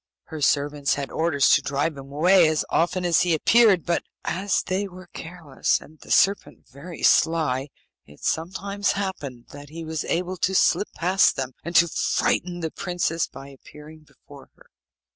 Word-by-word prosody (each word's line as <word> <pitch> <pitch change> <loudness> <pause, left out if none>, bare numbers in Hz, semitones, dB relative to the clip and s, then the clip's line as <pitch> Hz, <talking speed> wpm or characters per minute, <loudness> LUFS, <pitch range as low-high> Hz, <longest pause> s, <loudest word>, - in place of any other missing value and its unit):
Her 155 -2 -7
servants 145 0 +1
had 140 -1 -5
orders 160 -5 +1
to 150 - +5
drive 140 +3 -1
him 135 0 -11
away 175 +4 +4
as 155 -1 0
often 180 +2 0
as 170 -2 +3
he 175 -2 +2
appeared; 210 +1 +4
but 170 -1 0 0.2
as 190 +4 -1
they 190 +2 -2
were 185 -1 -12
careless, 165 -5 -2
and 155 0 -17
the - - -16
serpent 200 +1 +1
very 155 +6 -11
sly, 150 -5 +2 0.4
it 75 0 -18
sometimes 195 +4 -1
happened 145 -12 -5
that 145 0 -11
he 165 +1 -8
was 160 -1 -4
able 180 +2 -2
to 190 +2 0
slip 205 - +2
past 185 +3 +3
them, 130 -1 -4
and 170 +2 -6
to 170 - +6
frighten 175 +2 -1
the 160 -1 -3
princess 175 -3 -2
by 135 +1 -12
appearing 150 +3 -14
before 155 - -17
her. - - -23
165 Hz, 170 wpm, -24 LUFS, 145-180 Hz, 0.4 s, to